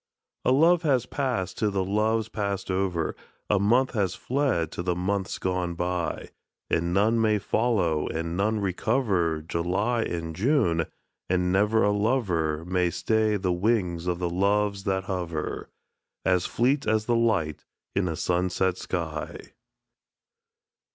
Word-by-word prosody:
A - - +3
love 165 +6 +5
has 135 -7 +2
passed 125 -10 -2
to 105 - +2
the 95 -2 0
loves 110 +2 +1
passed 100 -4 -3
over, 95 -3 -1 0.4
A 105 - +4
month 120 +6 +3
has 100 -6 0
fled 125 - 0
to - - -4
the 90 0 -1
months 95 +2 -1
gone 90 -2 -2
by; 90 0 -2 0.4
And 85 +1 +1
none 110 +5 +3
may 110 -1 +3
follow, 95 -8 +1
and 85 +1 -3
none 105 +3 +1
recover 95 -5 0
July 90 +9 0
and 85 -5 -3
June, 95 - +2 0.4
and 90 0 +1
never 105 +4 +3
a 105 - +3
lover 95 -8 0
May 90 0 +1
stay 110 +3 +1
the 95 -2 0
wings 90 -3 0
of 90 -1 0
the 90 0 -1
Loves 100 +2 +1
that 95 -1 0
hover, 90 -5 -4 0.6
As 90 -2 +2
fleet 135 +5 +1
as 110 -1 +2
the 120 - +2
light 110 -10 +1 0.3
in 95 -2 +1
a 80 - -2
sunset 90 +1 0
sky. 80 -4 -5
95 Hz, 145 wpm, -26 LUFS, 85-110 Hz, 0.6 s, love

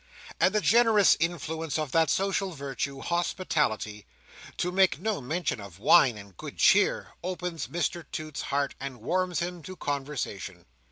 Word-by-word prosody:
And 190 - +3
the 210 - +3
generous 225 -4 +5
influence 160 -2 -2
of 155 -4 -3
that 165 -1 +3
social 195 +1 0
virtue, 140 -1 -4
hospitality 150 - -1 0.5
(to 180 - -1
make 190 -4 +3
no 215 -2 -1
mention 155 -2 -2
of 100 -3 -11
wine 115 +3 +5
and 100 -2 -12
good - - -9
cheer), - - +4
opens 180 -4 -4
Mr 170 0 -2
Toots's 155 -2 -5
heart, 140 0 0
and 135 -2 -6
warms 180 +7 0
him 175 0 -4
to 185 +5 -9
conversation. 135 - -4
160 Hz, 150 wpm, -28 LUFS, 135-180 Hz, 0.5 s, generous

